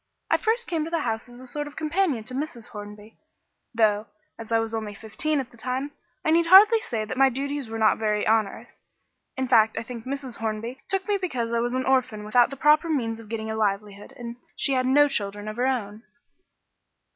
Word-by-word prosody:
I - - +5
first 465 +1 0
came 330 -3 -1
to 320 - -5
the 335 -1 -1
house 225 -1 -3
as 240 0 -12
a 260 - -11
sort 295 +4 -4
of 295 - -11
companion 310 - 0
to 235 - -5
Mrs. 260 -4 -5
Hornby, 210 +1 -10 0.5
though, 215 -2 +2 0.3
as 225 0 -9
I 225 - +4
was 225 0 -2
only 215 -2 -4
fifteen 230 +9 -1
at 255 -2 -5
the 235 - -17
time, 255 +5 -3 0.3
I 315 - +3
need 335 +1 +3
hardly 410 +5 +8
say 225 - -3
that 240 - -5
my 270 0 +6
duties 280 0 -4
were 225 - -4
not 220 -1 +3
very 210 -1 0
onerous; 220 -2 0 0.6
in 260 0 -1
fact, 220 -3 +4
I - - -2
think 235 -1 -8
Mrs. 265 -2 -4
Hornby 225 +3 -4
took 385 -1 -1
me 410 -1 +2
because 250 -12 -3
I 235 - +2
was 240 +1 -1
an 260 - -1
orphan 255 -5 +1
without 235 +3 +4
the 275 - -8
proper 300 +4 +4
means 230 -7 -1
of 220 -2 -13
getting 220 -1 -4
a - - -3
livelihood, 205 -1 -2
and 235 0 -7 0.2
she 275 - +1
had 255 -1 +1
no 290 +3 +5
children 205 -5 -3
of 215 +1 -5
her 250 +2 +1
own. 215 -5 -2
240 Hz, 220 wpm, -25 LUFS, 220-280 Hz, 0.6 s, hardly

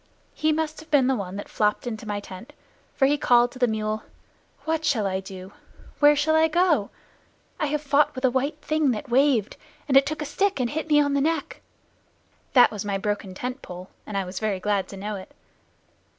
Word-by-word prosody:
He 310 0 +1
must 315 0 -2
have 315 +1 -14
been 290 -4 +4
the 265 +1 +2
one 195 -4 -5
that 205 - -6
flopped 210 +2 0
into 220 -2 -5
my 205 -1 -2
tent, 190 +2 -11 0.4
for 270 - +3
he 290 +2 +2
called 245 -2 +4
to 255 - -12
the 245 - +3
mule, 215 -1 -2 0.6
"What 320 0 -1
shall 265 -9 +1
I 190 -1 -1
do? 190 0 -10 0.5
Where 295 0 +6
shall 310 +2 +2
I 320 0 +5
go? 320 - +2 0.7
I 300 - 0
have 300 +1 -2
fought 285 +1 +2
with 255 +1 -1
a 255 - +3
white 275 +4 -1
thing 310 -2 +1
that 250 +5 -6
waved, 250 -4 +2 0.3
and 270 - +1
it 270 +1 +6
took 310 +1 -3
a - - -5
stick 390 +5 0
and 240 -2 0
hit 315 +1 -4
me 295 -1 +5
on 285 -1 +2
the 280 - +2
neck." 330 - -2 0.9
(That 250 -2 +7
was 210 -2 -5
my 200 -1 -1
broken 200 -1 -3
tent 250 +5 -5
pole, 180 +1 -9 0.2
and 210 - -3
I 195 - -1
was 180 +1 -6
very 210 -3 -1
glad 200 0 0
to 195 - -10
know 205 +1 -4
it.) 185 - -12
255 Hz, 220 wpm, -25 LUFS, 205-295 Hz, 0.9 s, That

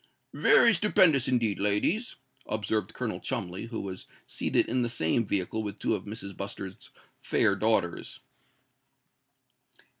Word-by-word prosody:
"Very 230 - +5
stupendous, 175 - +4
indeed, 120 -5 +1
ladies," 105 - 0 0.3
observed 110 -1 -1
Colonel 110 -6 -4
Cholmondeley, 95 +4 -4
who 115 -1 -5
was 95 -2 -7 0.2
seated - - 0
in 125 +2 0
the 120 - 0
same 115 0 0
vehicle 100 +3 0
with 105 -2 -5
two - - 0
of 100 -3 -3
Mrs. 100 -2 -7
Bustard's 100 -1 -6 0.3
fair - - +2
daughters. - - 0
110 Hz, 125 wpm, -28 LUFS, 100-120 Hz, 0.3 s, Very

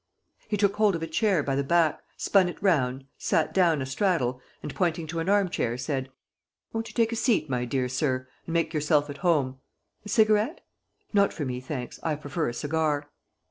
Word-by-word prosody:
He 210 - -1
took 200 0 +2
hold 210 -3 +4
of 165 - -4
a - - -2
chair 185 -1 +2
by 140 - -1
the 140 - +1
back, 160 +1 +2 0.2
spun 190 -3 +3
it - - -8
round, 135 -9 +1
sat - - +1
down 165 -7 +3
a - - -4
straddle 130 -4 0 0.2
and, 145 - -5
pointing 170 -3 0
to 165 +2 -4
an 165 +3 -1
arm 200 -1 +4
chair, 120 -8 -1
said: 130 +1 -3 0.6
"Won't 225 0 -2
you - - -12
take 230 -1 +2
a - - -1
seat, 220 - +1
my 125 -1 0
dear 130 +1 -1
sir, 130 0 -1 0.2
and 165 - -4
make 165 -1 +1
yourself 150 -1 +2
at 140 - -8
home? 140 -7 +1 0.4
A 210 - -9
cigarette? 215 +7 +2 0.5
Not 200 -1 +4
for 150 - -3
me, 125 -1 -3
thanks: 130 -2 -6
I 155 -2 0
prefer 150 0 -2
a - - -5
cigar." 150 -1 -1
155 Hz, 205 wpm, -27 LUFS, 135-190 Hz, 0.6 s, hold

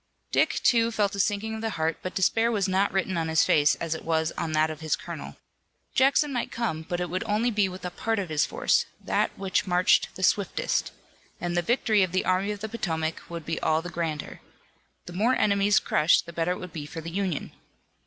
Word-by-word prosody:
Dick, - - +2
too, 230 -2 +4
felt 210 -3 0
a 200 - -5
sinking 205 +2 0
of 220 - -5
the 225 - -1
heart, 160 0 -1
but 185 - -6
despair 225 +5 +2
was 205 -4 0
not 190 +1 +1
written 190 -2 -1
on 165 - -1
his 160 -1 +3
face 145 -1 +4
as 165 -1 -3
it 160 - -6
was 160 0 0
on 160 - -4
that 155 +1 +2
of 155 - -8
his 155 -1 0
colonel. - - -8 0.6
Jackson 275 +2 +3
might 245 - -2
come, 225 -10 -2
but 175 +2 -4
it 180 - -1
would 185 +5 -3
only 225 +3 +1
be 205 -3 +2
with 185 0 -8
a 180 - -3
part 225 +4 -2
of 195 -4 -2
his 155 -1 +2
force, - - +1
that - - 0
which 195 0 -1
marched 180 0 +3
the 185 - -6
swiftest, 200 +1 +1 0.5
and 175 0 -2
the 175 - +2
victory 220 0 +2
of 185 -2 0
the 185 - +1
Army 185 +2 +1
of 205 -1 -4
the 220 - -3
Potomac 160 -8 -2
would 170 -2 -6
be 165 +1 -2
all 160 +1 +1
the 175 - -6
grander. 160 -3 -4 0.6
The 175 - -9
more 225 +8 +2
enemies 200 0 +3
crushed 155 +3 +3
the 170 - -10
better 170 +2 0
it - - -7
would 180 -2 -8
be 150 -3 -6
for 165 - -7
the 165 +1 -7
Union. 185 -4 -2
185 Hz, 230 wpm, -26 LUFS, 165-210 Hz, 0.6 s, too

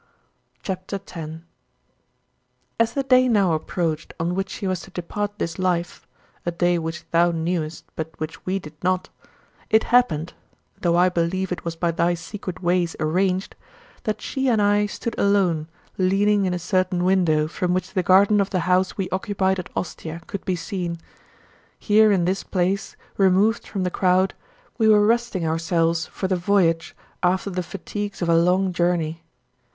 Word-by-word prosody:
CHAPTER 185 0 -4
X 195 0 -8
23. 160 -1 -7 1.4
As 230 0 +2
the 275 - +1
day 255 -1 +5
now 200 -7 +3
approached 160 0 -2
on 170 +2 0
which 190 +1 -2
she 205 - -6
was 185 -2 0
to 195 - -11
depart 205 +3 -4
this 170 -3 -3
life 175 -2 -1 0.4
a - - -1
day 175 0 +1
which 165 +1 -5
thou 170 +1 +4
knewest, 165 -1 -2
but 160 0 -6
which 160 +3 -6
we 185 +1 -1
did 155 -5 -9
not 185 0 0 0.6
it 220 - +4
happened 175 -10 +3 0.5
(though 170 -1 +2
I 180 +1 +5
believe 180 +2 -1
it 180 - -3
was 170 -1 -4
by 170 0 0
thy 170 +1 +1
secret 185 +1 -7
ways 175 -1 +1
arranged) 185 +4 0 0.5
that 215 -1 -2
she 270 -1 -1
and 225 -3 +3
I 205 0 +3
stood 230 +3 -4
alone, 185 -6 +2 0.3
leaning 200 +2 +3
in 180 - 0
a - - -1
certain 185 0 0
window 175 -5 +3
from 180 +2 -2
which 185 +1 -2
the 185 - +2
garden 200 +3 +5
of 195 - -1
the 185 -3 0
house 185 +1 +1
we 190 -2 -1
occupied 190 0 0
at 180 - -6
Ostia 165 -1 -5
could 200 - -6
be 185 - 0
seen. 175 -1 -4 0.8
Here 215 0 +4
in 185 -4 +2
this 190 +2 0
place, 190 +1 -1 0.2
removed 195 +4 +3
from 195 -3 -3
the 180 - -1
crowd, 185 +1 +2 0.5
we 220 - +4
were 210 -1 +6
resting 230 -6 +1
ourselves 165 0 +1
for 190 - -4
the 185 - +1
voyage 175 -3 +1 0.3
after 185 +2 +1
the 180 0 -2
fatigues 200 +2 -5
of 170 - 0
a 165 - +5
long 180 +3 +3
journey. 170 -2 0
185 Hz, 170 wpm, -23 LUFS, 170-195 Hz, 1.4 s, were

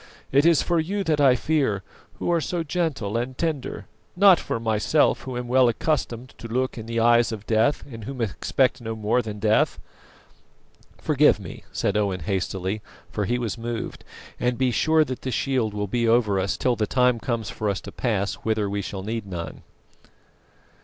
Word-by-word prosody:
It 140 +4 +5
is 170 -3 +4
for 170 -1 +1
you 195 +5 -1
that 155 -4 +1
I 135 -3 +6
fear, 130 -8 0 0.3
who - - -2
are 170 -1 +2
so 170 +1 -2
gentle 145 - -1
and 125 +2 -3
tender; 160 -5 -3 0.3
not 190 -1 +7
for - - -3
myself, 110 +6 +2
who 125 0 -5
am 125 0 -4
well 125 0 +5
accustomed 125 -3 -2
to 115 - -7
look 130 +3 -1
in 110 -1 -7
the 115 0 -1
eyes 120 +1 +4
of 105 -2 -6
Death, 115 +7 +2
and 115 -5 -9
who 135 -1 -6
expect 130 +4 0
no 115 -1 -4
more 110 +3 +1
than 105 -2 -6
death." 105 +1 +2 1.2
"Forgive - - +3
me," - - -10
said 100 - -1
Owen 100 -4 0
hastily, 95 +3 -2 0.3
for 105 - -1
he 120 +5 0
was 115 -2 -3
moved; 115 0 -5 0.4
"and 125 0 0
be 130 -1 +2
sure 155 +7 +3
that 130 -2 -5
the 130 - -3
shield 125 -2 0
will 105 0 -2
be 115 +3 0
over 115 -4 +3
us 95 +1 -1
till 125 -2 +1
the 110 -2 -1
time 125 -1 +3
comes 115 -3 -2
for 105 +1 -2
us 100 - -1
to - - -9
pass 100 -5 -1
whither 110 -2 -1
we 100 +1 -2
shall 95 0 -6
need 110 0 -4
none." 85 -3 -6
120 Hz, 190 wpm, -24 LUFS, 105-130 Hz, 1.2 s, not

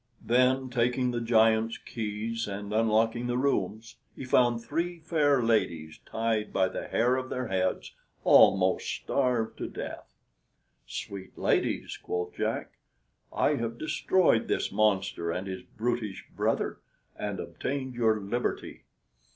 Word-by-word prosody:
Then, 130 +2 +3
taking 125 +1 +1
the 120 -1 -2
giant's 115 -1 +3
keys, 110 +1 -4
and 100 +1 -5
unlocking 115 +2 +2
the 120 0 0
rooms, 115 -4 -1 0.2
he 135 - -7
found 120 -2 +3
three 170 +5 -2
fair 150 -5 +2
ladies 85 -9 0
tied 110 -1 -1
by 95 -1 +2
the - - -5
hair 125 +3 +2
of 130 0 -4
their 125 -2 -3
heads, 95 -1 -1 0.3
almost 95 -1 +5
starved 125 -5 -1
to - - -3
death. - - -7 0.8
"Sweet 95 -1 -7
ladies," - - 0
quoth 90 0 -3
Jack, - - -3 0.5
"I - - +2
have 115 0 -3
destroyed 160 -2 +2
this - - 0
monster 95 -4 +1
and 90 +3 -2
his 95 -1 -5
brutish 110 -4 -3
brother, - - 0 0.4
and - - -4
obtained 130 -1 -4
your 110 -3 +2
liberty." 110 +5 -3
115 Hz, 130 wpm, -28 LUFS, 105-125 Hz, 0.8 s, almost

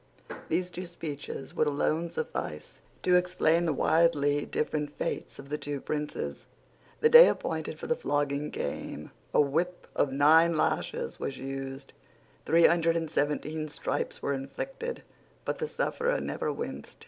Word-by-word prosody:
These 180 +2 0
two 180 0 -6
speeches 150 -5 -6
would 155 - +2
alone 155 +3 0
suffice 75 - -5 0.2
to 180 - +4
explain 180 -2 +3
the 165 - +2
widely 145 -2 +2
different 150 -1 -2
fates - - -3
of 140 - -11
the 150 +1 -2
two 145 -1 -3
princes. 150 +2 -4 0.5
The 460 - +6
day 480 +2 +11
appointed - - -2
for - - -7
the 480 - +1
flogging 145 - -1
came. - - -5 0.2
A - - +3
whip 165 +5 +1
of 135 - +2
nine 160 +4 +5
lashes - - -1
was 135 - -3
used. 135 0 -6 0.5
Three 165 +1 +6
hundred 165 -1 +4
and 165 -2 -3
seventeen 150 +1 -1
stripes 150 - -3
were 140 - +1
inflicted; 475 - -5 0.4
but - - -2
the 460 - -1
sufferer - - 0
never - - -2
winced. - - -6
155 Hz, 150 wpm, -29 LUFS, 145-175 Hz, 0.5 s, day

